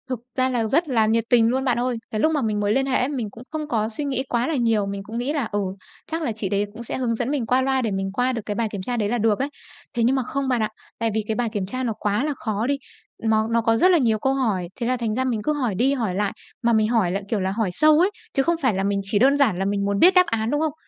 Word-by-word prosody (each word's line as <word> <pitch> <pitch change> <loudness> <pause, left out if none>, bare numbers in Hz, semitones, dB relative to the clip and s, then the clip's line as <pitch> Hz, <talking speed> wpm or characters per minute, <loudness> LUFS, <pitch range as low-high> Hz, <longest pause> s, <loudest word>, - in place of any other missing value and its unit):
Thực 255 -3 -2 0.2
ra 260 0 +3
là 240 -3 0
rất 310 +10 +1
là 225 -4 +3
nhiệt 225 +1 +2
tình 235 -2 +5
luôn 265 +2 0
bạn 245 -2 +1
ơi. 245 -1 -1
Cái 215 - -2
lúc 315 - +3
mà 300 -3 0
mình 215 -3 0
mới 205 0 +1
liên 270 +2 +2
hệ 265 -1 +1
ấy, 250 - +1
mình 250 -7 -3
cũng 230 +4 -12
không 310 -1 -4
có 220 -6 0
suy 230 +7 -5
nghĩ 265 -2 -1
quá 240 +1 0
là 325 - 0
nhiều, 230 -5 +2
mình 200 0 -5
cũng 220 +3 -7
nghĩ 255 +5 -1
là, 285 -5 0
ừ, 205 - 0 0.5
chắc 325 +1 -2
là 295 - -1
chị 215 -3 -4
đấy 200 +1 +1
cũng 230 +2 -8
sẽ - - -4
hướng 245 -3 0
dẫn 240 +2 -2
mình 280 -5 -1
qua 250 +3 +2
loa 265 0 +1
để 225 -4 -1
mình 195 0 -2
qua 250 +4 +1
được 230 - -3
cái 205 - -3
bài 230 0 0
kiểm 200 - -4
tra 240 +5 -3
đấy 210 -2 0
là 240 - 0
được 220 -2 +2
ấy. 275 +2 -1 0.4
Thế 235 - 0
nhưng 250 +4 +3
mà 265 - 0
không 275 +2 -3
bạn 245 -3 +1
ạ, 215 - 0 0.3
tại 230 0 +1
vì 220 0 0
cái 220 - -1
bài 240 -1 0
kiểm 205 -3 -1
tra 255 +7 -4
nó 235 -3 -1
quá 210 +4 0
là 300 0 -1
khó 220 -2 -2
đi, 280 0 +1 0.5
nó 220 -1 +2
nó 230 0 +3
có 225 0 +2
rất 365 +9 +5
là 350 - +5
nhiều 225 -7 +2
câu 265 +4 +1
hỏi, 215 -10 0
thế 235 -3 -3
là 255 0 +1
thành 225 -3 -2
ra 260 - 0
mình 240 -5 -1
cứ 300 - +1
hỏi 250 -9 -1
đi 260 +8 +2
hỏi 225 -9 -1
lại. 205 0 0 0.3
Mà 235 -1 +2
mình 215 -1 +3
hỏi 220 -7 +2
lại, 195 +2 -2
kiểu 220 - 0
là, 190 0 -1
hỏi 210 -1 0
sâu 305 - +5
ấy, 370 +4 +3 0.2
chứ 270 - +2
không 340 +5 +2
phải 255 -6 +2
là 190 0 -1
mình 200 0 0
chỉ 200 +1 0
đơn 275 +4 +4
giản 225 -11 +2
là 195 - 0
mình 200 0 0
muốn 200 0 0
biết 365 +2 +7
đáp 365 -1 +6
án, 225 -5 -1
đúng 295 +1 +1
không? 315 -2 0
235 Hz, 330 wpm, -23 LUFS, 215-265 Hz, 0.5 s, biết